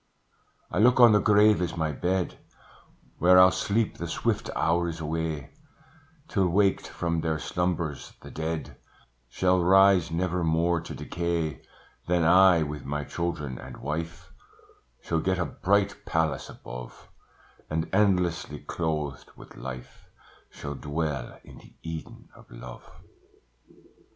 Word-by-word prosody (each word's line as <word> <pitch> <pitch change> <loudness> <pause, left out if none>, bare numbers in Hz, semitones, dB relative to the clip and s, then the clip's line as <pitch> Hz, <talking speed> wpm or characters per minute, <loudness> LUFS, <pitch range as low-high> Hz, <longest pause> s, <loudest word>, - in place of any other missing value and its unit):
"I - - -1
look 125 +4 +5
on 120 -2 +9
the 105 - +5
grave 105 -1 +4
as 85 -2 -2
my 80 -2 0
bed, 90 +4 -2 0.8
Where 90 +2 +6
I'll 90 0 +8
sleep 105 +4 -1
the - - -4
swift - - -1
hours 85 0 0
away, 80 -1 -3 0.8
Till 95 -5 +1
waked 100 +2 +2
from 85 -1 -2
their 80 -1 -1
slumbers, 85 -3 -3
the - - -11
dead 80 0 -4 0.5
Shall 90 +5 +2
rise, 95 -1 +5
never 90 +1 -1
more 85 +1 +1
to 85 - -8
decay: 85 -4 -3 0.5
Then 85 -1 +2
I, 90 0 +6
with 75 0 -6
my 75 +2 -3
children 75 -6 -4
and - - -10
wife, 80 +3 -5 0.7
Shall 80 - -1
get 95 +3 0
a 90 - 0
bright 100 +1 0
palace 80 -3 -1
above, - - -10 0.6
And 80 +1 -1
endlessly 90 -6 +1
clothed 75 -3 -4
with - - -14
life, 65 -1 -9 0.4
Shall 70 -1 -7
dwell 75 -2 -4
in - - -14
the - - -18
Eden 80 -1 -8
of - - -18
love. - - -11
85 Hz, 130 wpm, -27 LUFS, 80-90 Hz, 0.8 s, on